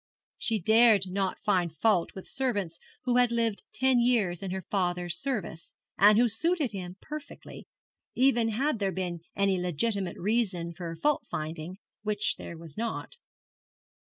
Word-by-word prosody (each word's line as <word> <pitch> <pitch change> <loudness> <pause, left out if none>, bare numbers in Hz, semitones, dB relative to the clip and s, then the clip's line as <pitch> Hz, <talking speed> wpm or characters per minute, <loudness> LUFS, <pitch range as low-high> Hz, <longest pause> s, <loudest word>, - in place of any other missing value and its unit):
She 225 -3 +1
dared 220 +1 +5
not 190 0 -1
find 175 -5 +1
fault 210 -7 +2
with 190 - -8
servants 205 -11 -2 0.2
who 250 -1 +2
had 245 -1 +4
lived 230 -3 0
ten 260 -1 +3
years 225 -8 +2
in 195 - -4
her 190 0 -4
father's 175 -2 0
service, 215 -11 -4 0.2
and 210 +1 +6
who 240 +1 +5
suited 300 - 0
him 180 -3 -6
perfectly 300 -1 -9 0.5
even 245 -3 +3
had 245 +3 0
there 195 -2 0
been 180 -1 -3 0.2
any 195 -2 +2
legitimate 180 +2 -1
reason 190 -5 0
for 170 -1 -6
fault 295 - +1
finding, 155 +3 -5 0.2
which 210 -1 0
there 170 - -8
was 160 -3 -10
not. 230 0 -3
200 Hz, 150 wpm, -29 LUFS, 180-235 Hz, 0.5 s, and